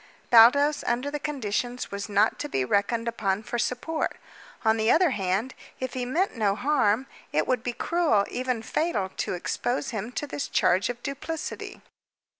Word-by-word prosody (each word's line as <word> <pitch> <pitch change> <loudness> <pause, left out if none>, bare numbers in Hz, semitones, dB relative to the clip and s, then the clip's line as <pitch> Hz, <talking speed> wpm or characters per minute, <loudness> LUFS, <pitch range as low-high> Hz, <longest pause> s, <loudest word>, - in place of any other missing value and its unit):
Baldos, 285 +6 +6
under 250 +4 0
the 295 - -3
conditions, 250 -3 -3
was 200 +2 -5
not 205 0 +2
to 295 - -4
be 130 - 0
reckoned 215 - +1
upon 210 -3 -1
for 240 - -3
support. 250 +7 -2 0.5
On 220 0 +4
the 220 +1 +1
other 335 +1 +5
hand, 200 +4 -1 0.3
if 260 -1 -4
he 250 -1 -2
meant 335 +9 0
no 205 -4 +1
harm, 255 -2 +2 0.3
it 155 - +1
would 250 -3 0
be 245 0 -3
cruel, 310 -11 +2
even 250 -2 -2
fatal, 225 - -1
to - - -1
expose 245 +9 -2
him 220 +1 -4
to 295 - -2
this 285 -1 -4
charge 185 +5 +2
of 240 0 -5
duplicity. 295 +3 -5
240 Hz, 170 wpm, -26 LUFS, 210-280 Hz, 0.5 s, Baldos